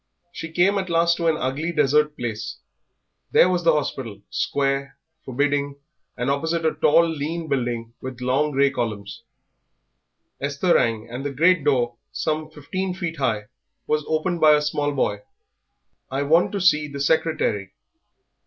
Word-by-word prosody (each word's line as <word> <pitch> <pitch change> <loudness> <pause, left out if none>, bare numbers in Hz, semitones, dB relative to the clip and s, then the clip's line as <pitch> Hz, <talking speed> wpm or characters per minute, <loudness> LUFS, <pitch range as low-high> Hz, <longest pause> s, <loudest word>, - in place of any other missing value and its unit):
She 165 -1 -7
came 190 +4 +3
at 190 -1 -4
last 170 0 +3
to 170 - 0
an 160 -1 +2
ugly 145 +6 -2
desert 150 -1 +2
place. 115 -1 -4 0.7
There - - +6
was 180 -1 0
the 165 -1 +5
hospital, 130 -8 -3
square, 140 0 -1 0.3
forbidding; 140 +2 0 0.4
and 125 - -2
opposite 160 +4 0
a 160 - +2
tall, 170 +3 +4
lean 160 +1 -3
building 120 -4 -2
with 130 -1 -7
long 130 +4 +1
grey 140 -1 +2
columns. 105 -4 -4 1.2
Esther 140 +6 +1
rang, 115 -1 +1
and 120 +3 -6
the 145 - -2
great 165 +4 +3
door, 120 -5 +1
some 155 0 -2
fifteen 180 +5 -4
feet 170 -3 -4
high, 110 -6 0 0.4
was 150 0 0
opened 165 +2 -1
by 155 -1 +7
a 150 - +1
small 145 0 0
boy. 115 -7 0 0.9
"I 135 +2 -1
want 160 +5 +3
to 200 - -1
see 150 -4 +4
the 140 -1 -7
secretary." 140 -10 0
145 Hz, 155 wpm, -23 LUFS, 130-165 Hz, 1.2 s, by